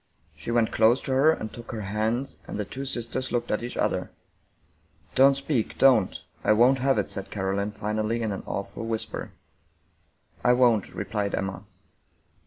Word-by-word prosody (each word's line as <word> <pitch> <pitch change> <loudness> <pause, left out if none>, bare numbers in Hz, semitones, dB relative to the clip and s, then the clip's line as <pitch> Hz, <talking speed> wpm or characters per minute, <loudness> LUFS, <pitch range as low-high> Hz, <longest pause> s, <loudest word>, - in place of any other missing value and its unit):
She - - -8
went 115 -1 +2
close 115 +4 +4
to - - -4
her 135 +4 +5
and 110 -8 -4
took 120 +1 -9
her 110 -3 -4
hands, 110 +6 -2
and - - -5
the 105 - -2
two 135 +6 -6
sisters 130 0 -2
looked 120 -1 -1
at 105 - 0
each 120 +1 -5
other. - - 0 1.0
"Don't 135 +1 +5
speak, 140 -5 -1
don't, 125 -8 +4 0.2
I 110 - +4
won't 125 +5 +5
have 135 -1 +2
it!" 105 - 0
said 100 - -2
CaroHne 100 +1 -1
finally 110 +2 -2
in 110 - -1
an 100 - -4
awful 100 +3 -4
whisper. 115 -1 -4 0.5
" - - -35
I 125 - +5
won't," 120 -5 +3
replied 100 0 -2
Emma. 95 +1 -4
115 Hz, 175 wpm, -26 LUFS, 105-125 Hz, 1.0 s, her